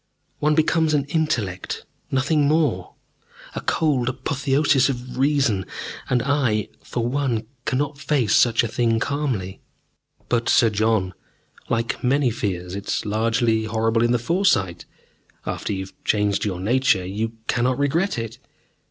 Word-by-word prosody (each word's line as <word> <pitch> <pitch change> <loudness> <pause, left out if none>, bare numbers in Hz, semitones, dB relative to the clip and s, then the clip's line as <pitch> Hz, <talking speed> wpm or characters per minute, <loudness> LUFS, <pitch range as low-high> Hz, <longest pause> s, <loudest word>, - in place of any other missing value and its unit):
One 150 +1 +2
becomes 160 0 +2
an 140 -2 +1
intellect, 115 - -2 0.2
nothing 140 +2 +2
more 155 0 +1 0.6
a - - -4
cold 135 -6 +1
apotheosis 135 +1 +1
of 125 -1 -5
reason. 135 -8 +2 0.5
And 125 -2 +2
I, 130 -7 +1
for 120 -2 -3
one, 125 -4 -1 0.2
cannot 145 0 -1
face 130 -8 +1
such 120 -1 +4
a - - 0
thing 115 +1 +1
calmly." 120 -9 -2 0.7
"But, 120 -1 0
Sir 115 -3 +5
John, 105 -3 +1 0.6
like 115 0 -1
many 130 0 +2
fears, 90 -5 -3
it 100 0 -6
is - - -1
largely 110 +1 +1
horrible 115 +1 +1
in 120 - +2
the 120 - +3
foresight. 120 - +1 0.6
After - - -3
you 95 -1 -2
have 95 - -15
changed 105 -1 +1
your 95 -4 -2
nature 110 -2 +2
you 110 +4 -3
cannot 125 +2 +1
regret 160 +7 +1
it. 115 -1 -5
120 Hz, 140 wpm, -23 LUFS, 110-140 Hz, 0.7 s, Sir